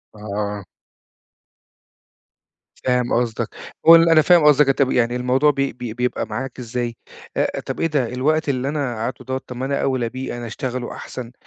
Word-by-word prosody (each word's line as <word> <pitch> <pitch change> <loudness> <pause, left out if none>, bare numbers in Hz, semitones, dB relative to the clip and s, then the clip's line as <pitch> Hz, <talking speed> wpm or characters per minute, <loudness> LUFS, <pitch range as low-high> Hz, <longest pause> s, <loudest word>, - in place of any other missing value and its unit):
آه. 105 -1 -4 2.2
فاهم 125 -1 +1
قصدك، 115 -2 0 0.4
وال 165 +1 +8
أنا 160 -1 +6
فاهم 175 0 +5
قصدك. 150 -1 +6
أنت 130 - +3
يعني 120 0 +1
الموضوع 130 +4 +3
ب 145 - -15
ب 135 -2 -1 0.2
بيبقى 125 0 -1
معاك 130 +4 -5
إزاي، 120 0 -3 0.4
آآ - - 0
طَب - - -5
إيه 165 - +2
ده 145 -6 0
الوقت 150 +4 +1
اللي 130 0 -1
أنا 140 -5 -2
قَعْدتُه 115 +3 -5
دوَّه، 130 0 -2
طَب 125 - -7
ما 130 +2 -3
أنا 140 0 -1
أوْلىّ 130 -4 0
بيه، 130 -1 -5
أنا 120 - -6
أشتغله 125 +2 -4
أحسن. 120 -2 -8
125 Hz, 170 wpm, -21 LUFS, 120-140 Hz, 2.2 s, وال